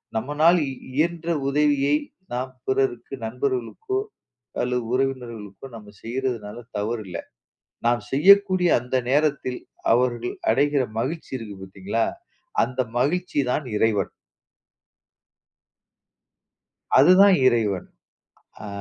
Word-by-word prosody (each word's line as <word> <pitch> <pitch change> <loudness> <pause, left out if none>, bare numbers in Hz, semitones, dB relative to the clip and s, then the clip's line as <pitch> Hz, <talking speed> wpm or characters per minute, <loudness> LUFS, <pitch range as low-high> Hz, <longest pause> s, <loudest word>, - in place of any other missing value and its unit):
நம்மனால் 150 +9 +3
இ - - -4 0.2
இயன்ற 165 +3 0 0.2
உதவியை, 145 0 +2 0.4
நாம் 130 +1 -3 0.2
பிறருக்கு, 130 -2 0
நண்பர்களுக்கோ 130 - -2 0.6
அல்லது 125 -1 -1
உறவினர்களுக்கோ 120 -6 -3
நம்ம 105 -2 -11
செய்றதனால 120 -3 -3 0.2
தவறு 110 +2 -2
இல்லை. 90 - -5 0.7
நாம் 120 -2 +2
செய்யக்கூடிய 185 +4 +5
அந்த 125 +1 -2
நேரத்தில், 140 -3 +1 0.3
அவர்கள் 120 0 +1 0.2
அடைகிற 140 +2 +2 0.2
மகிழ்ச்சி 160 +7 -4
இருக்கு 105 -5 -8
பார்த்தீங்களா, 95 +4 -2 0.6
அந்த 130 0 -4 0.2
மகிழ்ச்சி 180 +5 0
தான் 140 +2 -1
இறைவன். 105 -3 +1 2.9
அதுதான் 185 +6 +7
இறைவன். 105 -6 +1 0.8
அ. - - -6
130 Hz, 95 wpm, -24 LUFS, 115-150 Hz, 2.9 s, அதுதான்